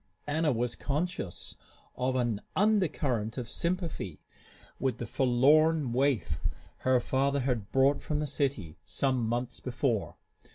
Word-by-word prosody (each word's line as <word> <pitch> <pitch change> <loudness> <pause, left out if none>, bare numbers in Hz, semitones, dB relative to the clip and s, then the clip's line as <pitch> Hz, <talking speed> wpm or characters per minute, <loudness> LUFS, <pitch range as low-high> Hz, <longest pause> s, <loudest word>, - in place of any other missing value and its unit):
Anna 155 +1 +1
was 120 0 -1
conscious 150 - -3 0.4
of 130 +1 0
an 120 -5 0
undercurrent 150 - +1
of 120 -2 -4
sympathy 170 - -2 0.6
with 130 -3 0
the 120 - -4
forlorn 140 +4 +3
waif 130 - +1 0.4
her 130 -1 +3
father 140 +3 +1
had 125 -6 -1
brought 135 +2 +3
from 150 - -2
the 150 - 0
city 135 - -2
some 130 -3 0
months 120 +2 -2
before. 120 -4 -1
130 Hz, 125 wpm, -30 LUFS, 120-145 Hz, 0.6 s, forlorn